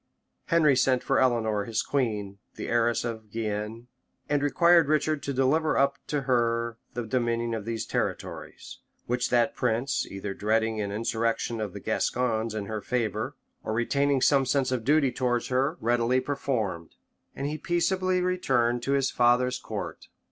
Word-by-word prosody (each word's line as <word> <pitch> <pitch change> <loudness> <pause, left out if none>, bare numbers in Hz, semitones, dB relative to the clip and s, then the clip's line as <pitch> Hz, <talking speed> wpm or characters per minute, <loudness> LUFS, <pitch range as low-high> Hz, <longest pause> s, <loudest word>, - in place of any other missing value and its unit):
Henry 155 -5 +4
sent 130 0 +2
for 135 - +2
Eleanor, 110 -5 +1
his 110 -2 -1
queen, 105 -7 -2 0.2
the - - -5
heiress 120 0 +1
of 110 -2 -5
Guienne, 110 +1 -4 0.4
and 145 -1 +1
required 170 +3 +4
Richard 155 0 +1
to 140 - -3
deliver 140 +4 +2
up 140 0 +2
to 145 -1 -1
her 115 -2 0 0.2
the 120 -1 -3
dominion 120 0 0
of 110 -2 -4
these 115 -1 -3
territories; - - -4 0.3
which 125 +1 -1
that 120 -2 +2
prince, 120 +5 0
either 100 0 -5
dreading 110 +1 0
an 100 -1 -3
insurrection 115 +1 -1
of 105 -4 -4
the - - -7
Gascons 115 -3 -1
in 105 -2 -3
her 110 +1 -4
favor, 115 +2 -2 0.3
or 110 - -3
retaining 140 +4 +1
some 135 -2 +4
sense 130 0 +1
of 125 -3 -1
duty 145 0 +3
towards 120 -1 -1
her, 135 +6 +1
readily 120 +2 +2
performed; 115 - -3 0.4
and 135 - -4
he 150 +2 -3
peaceably 185 +1 +1
returned 130 -10 +1
to 135 +3 -1
his 135 -1 +1
father's 125 +1 +3
court. - - -6
120 Hz, 160 wpm, -27 LUFS, 115-140 Hz, 0.4 s, Henry